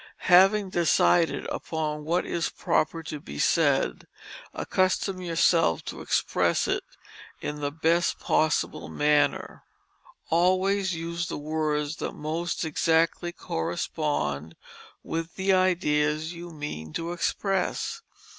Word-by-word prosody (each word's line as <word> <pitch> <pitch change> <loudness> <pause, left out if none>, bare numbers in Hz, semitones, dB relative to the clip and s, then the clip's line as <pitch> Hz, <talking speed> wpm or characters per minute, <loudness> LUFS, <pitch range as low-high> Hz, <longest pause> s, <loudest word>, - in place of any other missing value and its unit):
Having 195 +2 +6
decided 170 0 +3
upon 150 -2 -3
what 170 +3 +1
is 170 -1 -1
proper 165 +2 0
to 155 -2 -6
be 70 - -9
said - - +2 0.4
accustom 185 0 0
yourself 165 - +2
to - - -6
express - - +1
it - - 0 0.6
in 150 0 -5
the 145 0 -1
best 165 +3 +1
possible 155 0 0
manner. 150 0 +1 0.7
Always 185 +2 +2
use 170 +1 -3
the - - -4
words 150 0 -1
that - - -4
most 165 +3 -3
exactly 165 +2 +1
correspond 80 - -3 0.5
with 165 0 -4
the 190 0 +2
ideas 160 -4 +1
you 170 0 -8
mean 145 - -7
to 165 +1 -3
express. 195 - -1
165 Hz, 110 wpm, -26 LUFS, 150-175 Hz, 0.7 s, Having